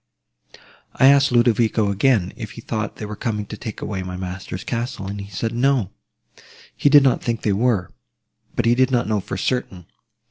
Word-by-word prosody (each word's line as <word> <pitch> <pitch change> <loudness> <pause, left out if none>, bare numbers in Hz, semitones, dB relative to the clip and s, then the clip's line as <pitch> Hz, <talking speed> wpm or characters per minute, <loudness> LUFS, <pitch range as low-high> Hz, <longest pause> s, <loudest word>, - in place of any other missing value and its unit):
"I 135 - +6
asked 140 -1 +5
Ludovico 115 -3 +3
again, 100 -3 +2
if 110 -2 -7
he 115 - -10
thought 110 -2 -4
they 105 - -6
were 105 0 -6
coming 105 -2 -3
to 105 - -8
take 110 0 -7
away 95 -3 -3
my 90 0 -6
master's 95 0 -6
castle; 115 -4 -4
and 100 +1 -5
he 100 - -9
said, 110 +4 -3
No, 120 -5 +1 0.8
he 145 - +3
did 145 -1 +7
not 130 -3 +2
think 115 -1 -2
they 105 - +2
were, 105 -4 +1 0.6
but - - 0
he 115 - +5
did 130 +1 +3
not 125 -3 +1
know 105 -1 +1
for 95 - -5
certain. 95 -5 -2
110 Hz, 190 wpm, -21 LUFS, 100-125 Hz, 0.8 s, did